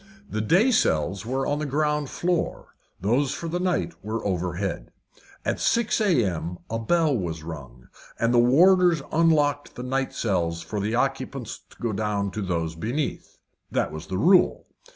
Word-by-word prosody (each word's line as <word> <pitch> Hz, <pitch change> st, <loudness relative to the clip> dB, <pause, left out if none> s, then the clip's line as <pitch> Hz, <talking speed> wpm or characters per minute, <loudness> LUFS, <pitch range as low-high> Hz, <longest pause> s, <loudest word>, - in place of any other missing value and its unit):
The 110 Hz, -, -2 dB
day 190 Hz, -, +4 dB
cells 95 Hz, -, +1 dB
were 135 Hz, +2 st, -1 dB
on 145 Hz, +1 st, 0 dB
the 150 Hz, -, -2 dB
ground 150 Hz, 0 st, 0 dB
floor, 175 Hz, -1 st, -2 dB, 0.3 s
those 125 Hz, +8 st, +1 dB
for 170 Hz, -, -5 dB
the 175 Hz, +2 st, -2 dB
night 180 Hz, -1 st, 0 dB
were 110 Hz, +1 st, -3 dB
overhead. 90 Hz, -1 st, -2 dB, 0.5 s
At -, -, -1 dB
six 235 Hz, -1 st, +1 dB
a.m. 95 Hz, -, +1 dB
a 115 Hz, -, -1 dB
bell 155 Hz, +5 st, +2 dB
was 85 Hz, -7 st, -3 dB
rung, 70 Hz, -6 st, -9 dB, 0.3 s
and 115 Hz, +1 st, +1 dB
the 120 Hz, -, +5 dB
warders 170 Hz, +5 st, +5 dB
unlocked 150 Hz, -3 st, +2 dB
the 125 Hz, -, -6 dB
night 135 Hz, +1 st, -1 dB
cells 85 Hz, -6 st, -1 dB
for 105 Hz, -, -4 dB
the 105 Hz, +3 st, -1 dB
occupants 135 Hz, -2 st, -2 dB
to -, -, -19 dB
go 115 Hz, -2 st, -2 dB
down 100 Hz, -1 st, -1 dB
to 105 Hz, -, -4 dB
those 85 Hz, -4 st, -2 dB
beneath. 120 Hz, -, -4 dB, 0.3 s
That -, -, 0 dB
was 80 Hz, +1 st, -8 dB
the 95 Hz, -, -3 dB
rule. 180 Hz, -, +4 dB
120 Hz, 165 wpm, -25 LUFS, 95-150 Hz, 0.5 s, the